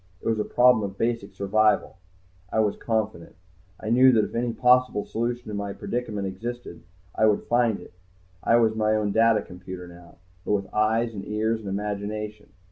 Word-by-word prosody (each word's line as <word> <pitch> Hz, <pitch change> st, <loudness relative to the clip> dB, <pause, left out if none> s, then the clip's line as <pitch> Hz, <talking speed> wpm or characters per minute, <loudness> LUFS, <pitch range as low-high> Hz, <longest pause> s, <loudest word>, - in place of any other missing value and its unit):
It -, -, -7 dB
was 110 Hz, -1 st, +1 dB
a -, -, +1 dB
problem 125 Hz, -2 st, +4 dB
of 100 Hz, -1 st, -5 dB
basic 115 Hz, -4 st, -2 dB
survival. 105 Hz, +2 st, +2 dB, 0.6 s
I -, -, 0 dB
was 105 Hz, -2 st, +2 dB
confident. 110 Hz, -7 st, -3 dB, 0.4 s
I 110 Hz, -, -4 dB
knew 130 Hz, +2 st, +7 dB
that 110 Hz, -2 st, +4 dB
if -, -, -9 dB
any 120 Hz, +1 st, -1 dB
possible 125 Hz, -3 st, +3 dB
solution 120 Hz, +2 st, -2 dB
to -, -, -5 dB
my 100 Hz, -1 st, -3 dB
predicament 110 Hz, -4 st, -4 dB
existed 110 Hz, 0 st, -6 dB, 0.3 s
I 110 Hz, -, +3 dB
would 105 Hz, -1 st, +2 dB
find 120 Hz, -3 st, +1 dB
it. -, -, -14 dB, 0.5 s
I 115 Hz, -, +4 dB
was 115 Hz, -2 st, +4 dB
my 110 Hz, 0 st, +1 dB
own 105 Hz, -1 st, 0 dB
data 115 Hz, 0 st, +3 dB
computer 90 Hz, 0 st, -9 dB
now, 85 Hz, 0 st, -15 dB, 0.3 s
but -, -, -1 dB
with 100 Hz, -2 st, -2 dB
eyes 110 Hz, +2 st, +1 dB
and 100 Hz, -2 st, -6 dB
ears 110 Hz, +2 st, -1 dB
and 105 Hz, -3 st, -7 dB
imagination. 105 Hz, +1 st, -4 dB
110 Hz, 185 wpm, -25 LUFS, 100-115 Hz, 0.6 s, knew